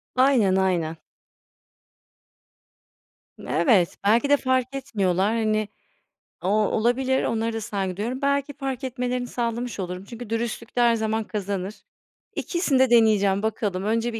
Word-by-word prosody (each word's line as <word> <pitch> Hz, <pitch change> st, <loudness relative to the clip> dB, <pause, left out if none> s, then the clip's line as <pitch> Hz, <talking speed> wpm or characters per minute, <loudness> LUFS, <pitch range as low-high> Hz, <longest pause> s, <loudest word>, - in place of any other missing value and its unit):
Aynen, 250 Hz, -8 st, +4 dB
aynen. 170 Hz, -4 st, 0 dB, 2.4 s
Evet, 195 Hz, -10 st, +2 dB
belki 230 Hz, +7 st, +3 dB
de 285 Hz, -, +6 dB
fark 260 Hz, 0 st, 0 dB
etmiyorlar. 205 Hz, -6 st, 0 dB
Hani, 215 Hz, -2 st, 0 dB, 0.8 s
o -, -, -1 dB
olabilir, 240 Hz, +5 st, +1 dB
onlara 225 Hz, 0 st, -1 dB
da 225 Hz, -, -3 dB
saygı 195 Hz, -3 st, -3 dB
duyuyorum. 245 Hz, +6 st, -3 dB
Belki 280 Hz, 0 st, 0 dB
fark 270 Hz, -1 st, -4 dB
etmelerini 250 Hz, -1 st, -2 dB
sağlamış 235 Hz, -1 st, -3 dB
olurum. 180 Hz, 0 st, -4 dB
Çünkü 235 Hz, +1 st, -9 dB
dürüstlük 230 Hz, 0 st, -3 dB
de 245 Hz, -, +2 dB
her 235 Hz, -1 st, +5 dB
zaman 220 Hz, 0 st, -1 dB
kazanır. 200 Hz, -1 st, -4 dB, 0.6 s
İkisini 330 Hz, -7 st, 0 dB
de 260 Hz, -2 st, +4 dB
deneyeceğim 210 Hz, -4 st, +4 dB
bakalım. 205 Hz, -4 st, -1 dB
Önce 230 Hz, +2 st, 0 dB
bir 225 Hz, -, -4 dB
225 Hz, 130 wpm, -24 LUFS, 205-250 Hz, 2.4 s, de